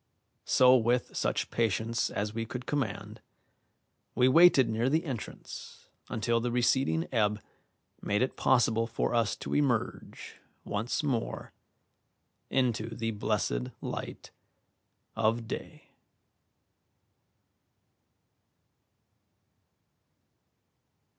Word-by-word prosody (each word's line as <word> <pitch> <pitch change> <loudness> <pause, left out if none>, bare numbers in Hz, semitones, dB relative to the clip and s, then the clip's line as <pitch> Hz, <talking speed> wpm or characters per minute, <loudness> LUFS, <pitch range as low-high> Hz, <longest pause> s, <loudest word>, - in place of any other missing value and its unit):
So 130 0 +6
with 120 +1 0
such - - -1
patience 115 +1 0
as 105 +1 -3
we 115 0 -2
could 125 +2 -6
command, 135 -9 -3 0.9
we 125 - +4
waited 140 -2 +6
near 115 +3 0
the 160 +4 +1
entrance 130 -7 -8 0.2
until 115 +1 0
the 120 +1 -2
receding 120 -9 +1
ebb 105 -3 +1 0.6
made 105 +4 +1
it 130 - -2
possible 115 -3 +2
for 115 +1 -2
us 115 -2 +1
to - - -6
emerge 135 -6 -2 0.3
once 110 +8 -2
more 130 -6 -2 1.0
into 115 -3 0
the 115 0 -2
blessed 60 - -1
light - - -6 0.8
of 115 +1 0
day. - - -8
115 Hz, 90 wpm, -30 LUFS, 110-130 Hz, 1.0 s, So